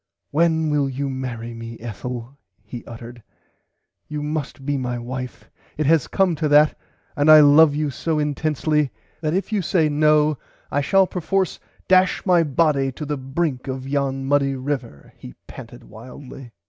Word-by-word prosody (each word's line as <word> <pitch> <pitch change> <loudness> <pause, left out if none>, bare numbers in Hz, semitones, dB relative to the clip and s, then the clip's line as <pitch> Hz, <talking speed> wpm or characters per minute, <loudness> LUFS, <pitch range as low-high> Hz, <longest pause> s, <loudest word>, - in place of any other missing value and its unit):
When 160 0 +2
will 145 -2 +1
you 135 +1 -3
marry 120 -3 -5
me 115 0 -8
Ethel 120 +2 -7 0.3
he 115 +3 -9
uttered 120 +1 -10 0.9
you 150 -1 -5
must 150 -3 -4
be 145 0 0
my 125 -2 -3
wife 125 +1 -7 0.3
it 155 - -1
has 160 -1 +3
come 190 -3 +1
to 155 0 0
that 150 +1 +5 0.4
I 155 +1 +7
love 145 +1 +6
you 150 -1 -1
so 155 +5 -2
intensly 150 0 0 0.3
that 155 +1 -1
if 195 +4 -2
you 210 -2 +1
say 165 -3 +1
no 150 -1 +2 0.3
I 145 - +1
shall 190 +7 +3
perforce 185 +1 -2 0.3
dash 185 0 +3
my 180 -3 +4
body 145 -3 +1
to 150 - -7
the 150 0 -2
[Pg 135 - -9
92] 135 +1 -12
brink 145 -7 -1
of 130 0 -5
yon 135 -1 -1
muddy 140 0 +1
river 130 - -5
he 60 - -12
panted - - -11
wildly. 125 +3 -12
145 Hz, 165 wpm, -21 LUFS, 130-155 Hz, 0.9 s, I